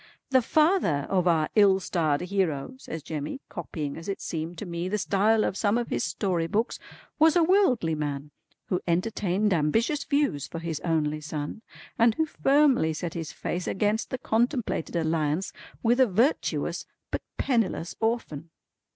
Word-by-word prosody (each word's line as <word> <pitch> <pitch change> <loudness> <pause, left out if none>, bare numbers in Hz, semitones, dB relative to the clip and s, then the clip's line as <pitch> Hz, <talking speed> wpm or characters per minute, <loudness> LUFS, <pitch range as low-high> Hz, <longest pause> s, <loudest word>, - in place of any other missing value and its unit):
"The 260 -1 +5
father 300 - +2
of 185 -2 +2
our 160 -3 +3
ill 200 -3 +5
starred 160 -6 0
hero" 180 - -1
says 160 - -7
Jemmy, 155 - -4
copying 150 -4 -5
as 165 +4 -7
it 195 - -3
seemed 165 +1 -4
to 210 - -5
me 170 0 -3
the 210 - 0
style 210 +3 +2
of - - -1
some 205 +2 +1
of 240 - -2
his - - -1
story 165 +2 -1
books, 220 +7 -1 0.4
"was 320 +1 +5
a 345 - +5
worldly 320 - +3
man 145 -1 -3 0.3
who 180 - -1
entertained 190 +2 +1
ambitious 225 - +1
views 280 - 0
for - - -7
his 165 -2 -3
only 155 -2 0
son 150 +5 -5 0.4
and 230 -1 +5
who 320 - +1
firmly 275 - +3
set 165 +2 -4
his 165 -2 -5
face 180 0 -4
against 210 +3 0
the 255 - -3
contemplated 235 - -1
alliance 160 +1 0 0.3
with 240 +2 +3
a 260 - +6
virtuous 230 - 0 0.2
but - - -2 0.2
penniless 225 -10 0
orphan. 220 -9 -2
185 Hz, 160 wpm, -27 LUFS, 160-230 Hz, 0.4 s, a